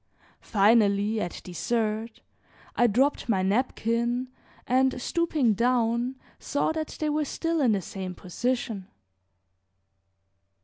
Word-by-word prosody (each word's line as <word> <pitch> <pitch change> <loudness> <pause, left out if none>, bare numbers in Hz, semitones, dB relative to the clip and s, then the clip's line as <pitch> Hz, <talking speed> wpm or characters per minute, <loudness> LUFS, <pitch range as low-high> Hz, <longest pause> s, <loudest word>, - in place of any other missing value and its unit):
Finally, 210 0 +3
at 175 - -4
dessert, 220 +4 -2 0.5
I 240 - +4
dropped 255 +4 +1
my 190 -4 +2
napkin, 235 +3 0 0.4
and 260 +1 +2
stooping 305 -5 +1
down 240 +2 +1 0.2
saw 285 +3 0
that 315 -1 -4
they 305 -1 0
were 305 +1 +1
still 330 +2 -1
in 240 -5 +4
the 195 -3 -1
same 185 +1 -6
position. 225 +2 -3
235 Hz, 105 wpm, -27 LUFS, 210-260 Hz, 0.5 s, I